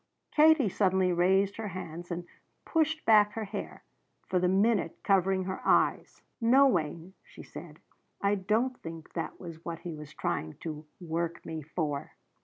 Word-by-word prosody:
Katie 310 -4 +5
suddenly 190 -1 +2
raised 190 +3 +2
her 220 -1 -4
hands 175 -2 -7
and 175 0 -4 0.4
pushed 320 -1 0
back 210 -2 +6
her 225 - -3
hair, 200 - -6 0.4
for 185 - +1
the 180 - +2
minute 195 -1 +2
covering 190 -1 +2
her 190 0 -4
eyes. - - +2 0.2
"No, 255 +5 +6
Wayne," 170 - -1
she - - -13
said, - - -10 0.4
"I 200 0 +2
don't 220 +6 0
think 165 -1 -9
that 165 - -4
was 165 -2 -9
what 170 -1 -5
he 175 - -5
was 150 -1 -9
trying 80 0 -2
to 155 -2 -6
'work 170 -1 -3
me' 160 -1 -5
for." 150 -1 -3
185 Hz, 160 wpm, -30 LUFS, 165-210 Hz, 0.4 s, back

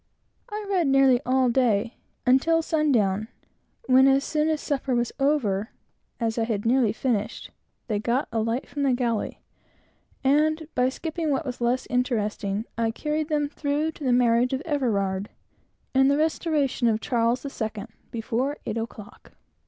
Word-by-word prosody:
I 420 0 -5
read 370 -6 +1
nearly 270 -2 +4
all 260 0 +3
day, 230 -3 +1 0.3
until 320 +6 +3
sundown; 225 -11 +1 0.6
when, 260 +1 +6
as 270 0 +4
soon 305 0 0
as 310 -1 0
supper 270 -3 -1
was 240 0 0
over, 235 -8 +1 0.5
as 230 -1 -1
I 225 - +1
had 215 -2 -2
nearly 240 -2 +3
finished, 225 -4 -2 0.3
they 215 -3 -1
got 240 +5 0
a 225 - 0
light 230 +4 -1
from 290 - -5
the 275 -2 +3
galley; 240 -3 -2 0.8
and 305 +3 +2
by 250 +1 +2
skipping 320 +3 -3
what 280 +2 0
was 250 -2 -5
less 240 +2 +1
interesting, 215 -4 -1
I 230 -1 +2
carried 300 +6 -2
them 295 -1 +1
through 295 +1 -1
to 315 - -11
the 255 - +2
marriage 245 +1 +3
of 265 - -1
Everard, 210 - -1 0.6
and 265 +1 +4
the 280 - +3
restoration 305 -5 +1
of 220 -1 +2
Charles 235 +1 0
the 280 - -5
Second, 220 -1 -5 0.2
before 240 +5 -2
eight 225 +1 -2
o'clock. 225 -2 -9
255 Hz, 160 wpm, -25 LUFS, 225-290 Hz, 0.8 s, when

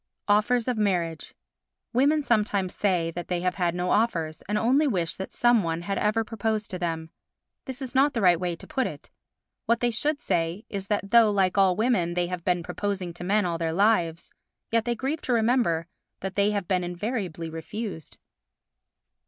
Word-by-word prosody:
Offers 220 +4 +3
of 245 -3 0
Marriage 175 -6 -1 0.6
Women 290 +5 +3
sometimes 210 -6 +1
say 180 -5 0
that 175 +1 -6
they 175 -1 -1
have 180 0 0
had 175 0 0
no 180 0 -1
offers, 165 -9 0
and 210 - +1
only 265 +8 +3
wish 175 -10 -1
that 190 - -6
some 240 -2 +4
one 165 -1 -2
had 195 +1 -2
ever 215 +2 +1
proposed 220 -1 -2
to 185 - -4
them. 165 -2 -3 0.5
This 265 0 -5
is 255 - -6
not 275 +1 +3
the 230 - 0
right 175 -3 +5
way 175 -1 -2
to - - -13
put 260 - -1
it. - - -10 0.6
What 235 +1 +3
they 240 0 +1
should 290 +6 0
say 170 - -1
is 195 -2 -5
that 200 -1 -2
though, 230 -2 +7
like 195 -3 +2
all 190 -2 +4
women, 210 -7 +1
they 175 0 +1
have 175 -1 -5
been 180 -1 +1
proposing 190 -2 -3
to 175 - -8
men 205 +2 +2
all 170 -2 -2
their 165 -1 -1
lives, 170 -4 +1 0.4
yet 230 0 +2
they 240 -1 0
grieve 275 +6 -2
to 250 - -1
remember 225 -8 +2 0.4
that 190 0 -4
they 200 +1 +2
have 205 -4 -2
been 185 -1 +1
invariably 175 -3 -4
refused. 165 - -6
200 Hz, 195 wpm, -26 LUFS, 175-230 Hz, 0.6 s, though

